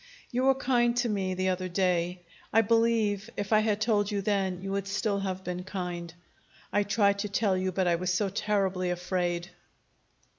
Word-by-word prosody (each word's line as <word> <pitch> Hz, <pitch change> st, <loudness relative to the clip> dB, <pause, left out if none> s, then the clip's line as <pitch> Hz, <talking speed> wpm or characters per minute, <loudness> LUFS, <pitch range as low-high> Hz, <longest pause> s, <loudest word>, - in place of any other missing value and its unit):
"You 250 Hz, +2 st, 0 dB
were 270 Hz, 0 st, +5 dB
kind 245 Hz, -2 st, +2 dB
to 245 Hz, -1 st, +1 dB
me 190 Hz, -3 st, -1 dB
the 185 Hz, +1 st, 0 dB
other 185 Hz, 0 st, -2 dB
day. 180 Hz, -1 st, 0 dB, 0.3 s
I 225 Hz, -, +5 dB
believe, 225 Hz, -2 st, +2 dB
if 205 Hz, +1 st, -1 dB
I 215 Hz, -, +6 dB
had 215 Hz, -1 st, +1 dB
told 210 Hz, -2 st, +2 dB
you 200 Hz, -2 st, -2 dB
then, 195 Hz, -3 st, 0 dB
you 195 Hz, -, -4 dB
would 195 Hz, 0 st, -2 dB
still 200 Hz, +1 st, 0 dB
have 190 Hz, -1 st, -3 dB
been 180 Hz, 0 st, -4 dB
kind. 180 Hz, -3 st, -5 dB, 0.6 s
I 205 Hz, -, +4 dB
tried 200 Hz, 0 st, +2 dB
to 210 Hz, 0 st, -2 dB
tell 200 Hz, -1 st, +1 dB
you, 185 Hz, 0 st, -1 dB
but 185 Hz, 0 st, 0 dB
I 170 Hz, -1 st, +3 dB
was 180 Hz, +1 st, -1 dB
so 195 Hz, +3 st, +1 dB
terribly 195 Hz, -2 st, 0 dB
afraid. 180 Hz, 0 st, -2 dB
195 Hz, 190 wpm, -28 LUFS, 185-210 Hz, 0.6 s, I